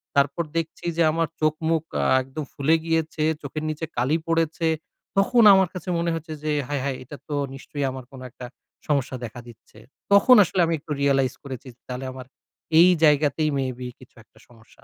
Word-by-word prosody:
তারপর 140 +4 +2
দেখছি 165 0 -4
যে 170 - +4
আমার 165 +1 0
চোখ, 155 0 +3 0.2
মুখ 165 -2 +1 0.2
আ - - 0 0.2
একদম 135 +4 -6
ফুলে 150 +4 +2
গিয়েছে, 160 -1 -1 0.2
চোখের 150 +2 -5
নিচে 155 +1 -3
কালি 130 +6 +2
পড়েছে, 165 0 0 0.5
তখন 235 +4 +4
আমার 190 -1 +4
কাছে 185 0 -7
মনে 170 0 0
হচ্ছে 160 0 -6
যে, 155 - -1 0.2
"হায়! 145 -2 -2
হায়! 135 -2 -2
এটা 140 +3 -10
তো 150 - -2 0.2
নিশ্চয়ই 140 +1 -4
আমার 130 -1 -8
কোন 135 - -11
একটা 125 - -10 0.4
সমস্যা 140 -3 0
দেখা 120 +2 -9
দিচ্ছে।" 110 -2 -16 0.3
তখন 250 +6 +7
আসলে 185 +1 -3
আমি 165 - 0
একটু 150 - -12
realize 135 -2 +2
করেছি 135 -2 -8 0.2
তাহলে 125 +1 -5
আমার 130 -1 -9 0.5
এই 175 +2 +8
জায়গাতেই 150 0 +3
মে 135 - 0
বি 125 - -5
কিছু 130 - -18
একটা - - -30
সমস্যা 115 -2 -21
150 Hz, 185 wpm, -24 LUFS, 130-165 Hz, 0.5 s, এই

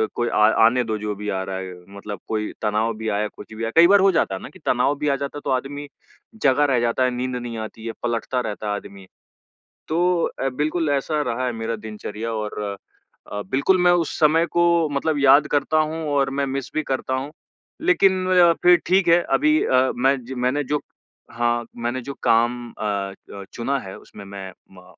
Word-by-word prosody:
कोई 120 0 0
आ 105 - +4 0.2
आने 125 +2 +3
दो 110 -2 -2
जो 105 0 -3
भी 105 +1 -5
आ 95 -1 -1
रहा 95 0 -5
है, 95 -1 -6 0.2
मतलब 100 -1 -7
कोई 110 -1 -2
तनाव 110 +2 +1
भी 110 0 -5
आया, 105 +1 0
कुछ 105 +1 -13
भी 110 +1 -6
आया, 115 - -2
कई 170 +1 +9
बार 200 +2 +6
हो 195 0 +5
जाता 95 - +1
है 95 - -7
ना - - -8
कि - - -15
तनाव 125 +4 +2
भी 150 - -1
आ 140 - +2
जाता 140 +1 -5
है, - - -7
तो - - -2
आदमी 140 +3 -3 0.6
जगा 140 +1 +4
रह 135 -4 +2
जाता 120 +2 +1
है, 125 - +2
नींद 125 +1 -3
नहीं 120 -2 -5
आती 110 0 -7
है 115 - -4
पलटता 120 +2 -1
रहता 105 -2 -5
है 105 - 0
आदमी। 100 -2 -10 0.8
तो 175 +2 +1 0.2
अ, 135 - +1
बिल्कुल 155 +4 -1
ऐसा 150 +2 0
रहा 125 -1 -2
है 125 - 0
मेरा 115 0 -3
दिनचर्या 110 +1 -6
और 105 -1 -4 0.7
अ, 105 - -3
बिल्कुल 140 +8 +3
मैं 175 - +6
उस 175 -2 0
समय 160 +2 +4
को 170 -2 +3
मतलब 145 +1 0
याद 140 +2 +6
करता 145 +2 +1
हूँ 155 +1 0
और 140 -2 +1
मैं 140 - +1
मिस 135 -1 -4
भी 155 - 0
करता 130 -1 -2
हूँ 135 +3 -4 0.5
लेकिन 315 - +4
मैं 185 0 0
ज़्या 175 -2 +6
फिर 175 0 +7
ठीक 185 0 +3
है, 170 +1 +5
अभी 305 +2 +2
अ, 130 0 +3
मैं 135 +3 +2
ज 130 - -7
मैंने 130 +4 0
जो 150 +2 -1 0.5
हाँ 120 0 0
मैंने 120 +2 -2
जो 140 +3 -6
काम 115 +2 +3 0.2
अ - - -8
अ, 100 -1 -4
चुना 135 +4 -1
है 95 -5 -9
उसमे 100 - -13
मैं 100 -1 -8 0.2
म 90 -1 -15
130 Hz, 220 wpm, -22 LUFS, 110-150 Hz, 0.8 s, कई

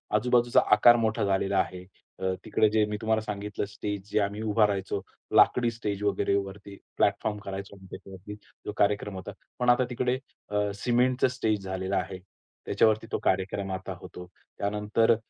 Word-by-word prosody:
आजूबाजूचा 120 +2 +4 0.2
आकार 120 +2 +7
मोठा 110 -1 0
झालेला 95 0 +1
आहे. 90 -1 -2 0.4
अ, 95 0 0
तिकडे 110 - +3
जे 110 0 +3
मी 105 0 -3
तुम्हाला 110 0 +1
सांगितलं, 105 -1 -4
स्टेज 100 0 -5
जे - - +2
आम्ही 100 +2 -2
उभा 110 -1 +3
राहायचो, 100 0 -2 0.3
लाकडी 120 -1 +5
स्टेज 105 -3 -4
वगैरे 100 -1 +1
वरती, 100 0 -5 0.2
प्लॅटफॉर्म 105 -1 +1
करायचो 100 +1 -6
आम्ही 95 -1 -15
त्याच्यावरती 95 +2 -9 0.3
जो - - -3
कार्यक्रम 105 -1 +1
होता. 95 - -6 0.3
पण 125 0 +2
आता 125 +1 +4
तिकडे 125 +1 0 0.3
अ, 105 0 0
सिमेंटचं 125 +4 +2
स्टेज 110 -5 -1
झालेलं 95 +1 -2
आहे. 95 0 -2 0.5
त्याच्यावरती 110 0 +2
तो - - 0
कार्यक्रम 95 +1 0
आता 95 0 -4
होतो. 90 -2 -10 0.3
त्यानंतर 105 +3 +2
105 Hz, 160 wpm, -28 LUFS, 95-110 Hz, 0.5 s, आकार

